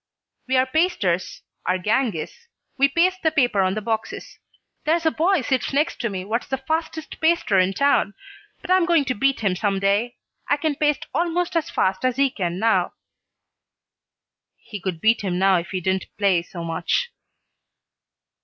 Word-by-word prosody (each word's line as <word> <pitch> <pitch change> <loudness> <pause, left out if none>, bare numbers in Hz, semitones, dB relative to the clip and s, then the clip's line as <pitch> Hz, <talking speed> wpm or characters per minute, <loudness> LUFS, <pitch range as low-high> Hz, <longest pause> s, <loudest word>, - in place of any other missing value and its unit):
"We 260 0 +2
are 255 - +4
pasters, 260 - 0 0.2
our 185 - +2
gang 215 +3 0
is. 155 - -5 0.4
We 275 +1 +4
paste 365 +5 +1
the 320 - +3
paper 245 -9 +2
on 190 +1 +1
the 215 - -4
boxes. 220 0 -4 0.4
There's 325 +2 +1
a 320 - +4
boy 350 +2 +2
sits 265 0 -1
next 300 +4 0
to 235 - -1
me 190 -2 -5
what's 225 +4 -2
the 265 - -2
fastest 315 +3 -4
paster 320 - +3
in 185 +1 +2
town, 280 -5 +2 0.5
but 370 - -4
I'm 370 -2 +4
going 335 -5 +3
to 255 - 0
beat 275 +3 0
him 195 -4 +1
some 200 0 0
day. 200 +5 0 0.3
I 290 - +2
can 310 0 0
paste 295 0 0
almost 345 +3 -1
as 330 -3 0
fast 190 +3 0
as 255 -1 +1
he 275 -1 +3
can 175 -5 -3
now." 195 -4 +1 1.6
"He 205 -4 -9
could 175 -4 -4
beat 225 +1 +3
him 185 -3 -2
now 190 0 +4
if 175 +2 -4
he 185 - -2
didn't 190 +1 -1
play 195 -4 +3
so 170 0 -8
much." 170 - -1
235 Hz, 180 wpm, -22 LUFS, 190-310 Hz, 1.6 s, are